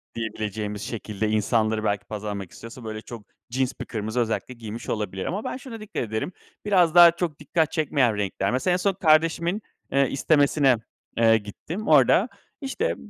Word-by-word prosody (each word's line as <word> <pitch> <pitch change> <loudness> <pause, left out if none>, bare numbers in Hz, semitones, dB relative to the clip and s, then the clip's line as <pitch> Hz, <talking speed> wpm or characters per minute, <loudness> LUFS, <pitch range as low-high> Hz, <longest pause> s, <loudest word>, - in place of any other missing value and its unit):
diyebileceğimiz 105 -2 -4
şekilde 110 -2 -3
insanları 110 0 +1
belki 105 -2 -1
pazarlamak 105 -3 -5
istiyorsa, 115 +2 -11
böyle, 110 -1 -5
çok 115 -3 -9 0.3
cins 130 0 0
bir - - -4
kırmızı 110 +1 -3
özellikle 120 +2 -1
giymiş 115 -1 -8
olabilir. 95 -3 -3
Ama 200 +5 -3
ben - - -4
şuna 250 -3 -9
dikkat 215 - -4
ederim, 110 - -3 0.3
biraz 180 -5 +3
daha 175 -1 +10
çok 170 -3 -3
dikkat 155 +1 0
çekmeyen 140 -8 +1
renkler. 100 0 -1
Mesela, 155 +8 +1
en - - +2
son 195 +2 +1
kardeşimin, 165 +2 +2 0.3
eee, 140 0 +3
istemesine, 140 -1 +3 0.4
eee, 115 -1 +5
gittim. 160 - -7
Orada, 150 - +5 0.3
işte, 355 - -1
125 Hz, 160 wpm, -25 LUFS, 110-165 Hz, 0.4 s, daha